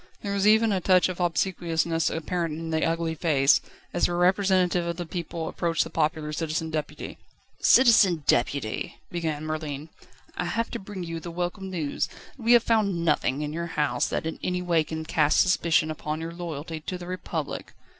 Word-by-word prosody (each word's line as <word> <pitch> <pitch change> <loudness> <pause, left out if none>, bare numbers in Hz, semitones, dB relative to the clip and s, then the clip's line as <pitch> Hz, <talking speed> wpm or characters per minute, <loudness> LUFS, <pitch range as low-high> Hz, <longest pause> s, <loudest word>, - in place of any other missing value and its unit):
There 200 -1 -2
was 200 +1 +2
even 220 +1 +5
a 190 -2 0
touch 185 0 +4
of 185 - -5
obsequiousness 170 -1 0
apparent 165 -1 -2
in 165 0 -5
the 160 0 +1
ugly 165 0 0
face, 145 -4 +3 0.3
as 175 - +2
the 175 - -2
representative 180 -1 +2
of 170 0 -3
the 175 - -4
people 170 -1 -4
approached 165 -2 0
the 165 - -9
popular 155 -1 -1
Citizen 160 0 -2
Deputy. 155 -2 -5 0.4
"Citizen 220 - +5
Deputy," 120 -2 0
began 160 -3 -2
Merlin, 155 -1 -4 0.5
"I 180 - -2
have 230 +7 -2
to - - -4
bring 195 -2 -7
you 165 -1 -4
the 170 - -7
welcome 180 +3 -4
news, 160 -6 -2 0.3
that 270 - -14
we 230 +1 +4
have 240 -1 +6
found 200 -7 +1
nothing 150 -2 +1
in 150 0 -4
your 170 +1 -3
house 140 -5 +1
that - - -2
in 160 - -4
any 180 0 -1
way 170 -3 +2
can 160 0 -5
cast 150 -2 +3
suspicion 170 -3 +3
upon 155 0 -4
your 165 +1 -5
loyalty 165 -2 -5
to 180 +4 -5
the 175 - -9
Republic. 175 -4 -5
165 Hz, 185 wpm, -26 LUFS, 155-180 Hz, 0.5 s, have